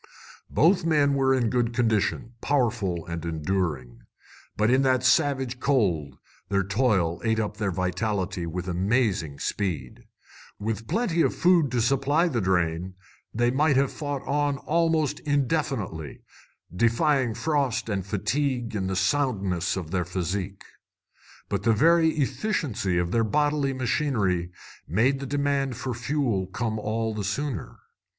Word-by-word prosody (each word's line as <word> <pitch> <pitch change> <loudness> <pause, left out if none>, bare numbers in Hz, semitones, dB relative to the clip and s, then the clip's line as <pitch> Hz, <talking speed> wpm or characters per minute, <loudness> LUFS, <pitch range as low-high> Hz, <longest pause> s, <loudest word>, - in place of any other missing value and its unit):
Both 170 +6 +3
men 150 -4 +3
were 135 -1 +2
in 120 -4 +1
good 120 -2 0
condition, 115 0 0
powerful 110 - 0
and 85 -2 -5
enduring. 80 -7 -2 0.6
But 105 +2 +3
in 130 +1 +4
that 130 -2 +2
savage 135 -3 +2
cold 100 - 0 0.3
their 100 -1 +1
toil 100 -5 +1
ate 110 -1 +1
up 105 -1 -3
their 105 -3 -1
vitality 95 0 -2
with 90 +2 -4
amazing 95 - 0
speed. 80 -8 -3 0.5
With 110 +1 -4
plenty 195 - +1
of - - +1
food 175 -5 +4
to 120 -1 0
supply 140 +7 +2
the 125 -9 -1
drain, 90 -1 0 0.4
they 120 +2 +1
might 145 +2 +2
have 135 0 +2
fought 145 -3 -4
on 145 0 0
almost 160 0 +1
indefinitely, 135 - -2 0.5
defying 120 - +2
frost 140 -8 0
and 100 -3 -2
fatigue 120 +5 -1
in 95 -2 -1
the 95 - -2
soundness 95 - 0
of 85 -4 -5
their 90 -1 0
physique. 95 +2 -4 0.8
But - - -2
the 115 +2 +3
very 160 +7 +4
efficiency 135 - -1
of 85 0 0
their 115 +2 +2
bodily 145 +4 +1
machinery 120 - 0 0.4
made 125 - +2
the 135 - -5
demand 140 -2 0
for 130 0 -3
fuel 120 -6 -1
come 110 +3 -3
all 110 +1 -2
the 105 -1 -4
sooner. 110 - -3
115 Hz, 140 wpm, -26 LUFS, 95-140 Hz, 0.8 s, in